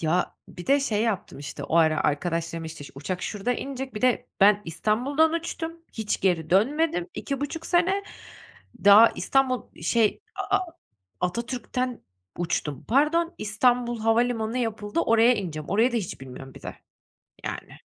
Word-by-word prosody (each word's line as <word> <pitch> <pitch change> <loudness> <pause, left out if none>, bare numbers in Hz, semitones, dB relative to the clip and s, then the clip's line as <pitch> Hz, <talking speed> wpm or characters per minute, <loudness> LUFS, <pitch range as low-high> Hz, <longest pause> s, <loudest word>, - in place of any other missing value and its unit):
Ya, 170 +3 0
bir 175 - -10
de 280 +1 +4
şey 220 -5 0
yaptım, 220 -10 -2
işte, 140 -1 -6
o 165 - 0
ara 155 -2 +4
arkadaşlarım, 165 +2 -1
işte, 160 -2 -8
şu - - -12
uçak 180 +6 -4
şurada 210 +4 -1
inecek, 265 0 -5
bir 210 - -4
de 250 -3 +2
ben, 205 +1 +6
İstanbul'dan 250 - +1
uçtum, 330 0 -3 0.2
hiç 220 -2 -2
geri 170 -5 +1
dönmedim 315 - +2
2.5 290 +4 -4
sene. 370 +3 +2 0.8
Daha 210 +3 +9
İstanbul, 265 -2 +1 0.2
şey, 225 -3 +2 0.3
A - - +5
A 370 - -3 0.6
Atatürk'ten 240 +5 -2 0.4
uçtum. 155 -5 -2
Pardon, 330 +7 +2
İstanbul 240 +2 +1
Havalimanı 225 +1 +1
yapıldı, 215 -5 -2
oraya 230 +6 +5
ineceğim. 160 -7 -5
Orayı 230 +5 +3
da - - 0
hiç 190 -10 -4
bilmiyorum 135 0 -10
bir - - -13
de, - - -7 0.7
yani. - - -6
225 Hz, 145 wpm, -26 LUFS, 180-260 Hz, 0.8 s, Daha